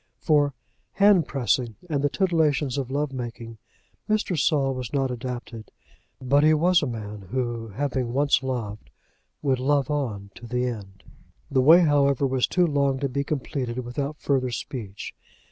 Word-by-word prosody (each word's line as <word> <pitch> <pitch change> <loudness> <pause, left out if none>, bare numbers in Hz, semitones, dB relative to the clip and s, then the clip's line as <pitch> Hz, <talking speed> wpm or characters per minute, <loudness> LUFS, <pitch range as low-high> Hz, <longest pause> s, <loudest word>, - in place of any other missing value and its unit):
For 145 -4 +2 0.4
hand 200 -5 +5
pressing, 125 -3 0
and 145 -4 -1
the 145 - +3
titillations 150 -7 +1
of 130 -2 -4
love 140 +1 -1
making, 115 -2 -7 0.5
Mr. 215 -4 +1
Saul 140 -3 +2
was 130 -3 -5
not 135 -2 0
adapted; 120 -2 -6 0.5
but 140 +3 +3
he 155 0 +5
was 175 +3 +4
a 145 - -1
man 105 -4 -6
who, 120 -2 -2
having 125 +2 -2
once 140 +2 +2
loved, 115 - -4 0.5
would 135 -3 +1
love 140 +1 +1
on 110 -9 -3
to 120 - -11
the 125 +1 -1
end. 100 -6 -6 0.5
The 130 - +3
way, 160 +7 +8
however, 140 -4 +3
was 130 -1 +1
too 180 -1 +2
long 140 -4 +1
to 140 0 -2
be 140 +2 -1
completed 130 -4 -3
without 140 +5 -3
further 130 -4 0
speech. 110 -4 -6
135 Hz, 160 wpm, -25 LUFS, 120-145 Hz, 0.5 s, way